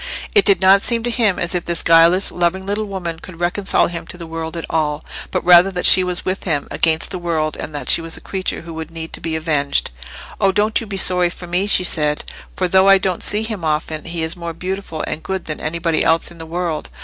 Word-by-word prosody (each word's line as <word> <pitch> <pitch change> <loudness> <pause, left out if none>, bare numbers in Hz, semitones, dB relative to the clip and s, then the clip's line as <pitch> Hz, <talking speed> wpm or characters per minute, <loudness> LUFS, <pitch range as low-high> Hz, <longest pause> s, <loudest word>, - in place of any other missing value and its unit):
It 415 - +5
did 200 - +3
not 190 +1 +6
seem 230 +1 0
to 240 - -1
him 225 -6 +1
as 175 0 -2
if 175 -2 -1
this 170 -1 -2
guileless 165 +3 +5
loving 180 +2 -1
little 205 +2 -2
woman 175 -5 -5
could 170 -1 -12
reconcile 180 +3 +1
him 170 -1 -6
to - - -7
the 170 - -8
world 160 0 -6
at 165 - -5
all, 150 -2 -2 0.2
but - - -3
rather 180 +1 +7
that 180 -2 -3
she 185 - +7
was 180 -1 -2
with 185 +1 -3
him 150 -6 -1
against 160 0 +1
the 185 - -4
world, 160 -3 -2
that 150 -1 -6
she - - +4
was 165 0 -4
a - - -10
creature 190 -1 -4
who 170 -1 -10
would 160 -1 -6
need 165 -1 -8
to - - -5
be 165 -1 -3
avenged. 150 - -1 0.5
"Oh, 195 - +3
don't 210 +4 +1
you 225 - -8
be 200 -1 -5
sorry 180 -2 +4
for 175 - -9
me," 180 +3 -1
she 185 - +6
said; 150 -4 +1 0.3
"for 185 - 0
though 190 +2 +4
I 195 - +7
don't 185 -2 -2
see 210 +1 +1
him 215 -5 -5
often, 155 0 -2
he 170 -1 -3
is 160 +1 -1
more 170 -1 -6
beautiful 180 -1 -5
and 155 - -4
good 190 +1 -4
than 155 - -5
anybody 165 +1 -1
else 165 +1 +2
in 170 - -14
the 160 - -8
world. 170 -2 -3
175 Hz, 245 wpm, -18 LUFS, 160-190 Hz, 0.5 s, rather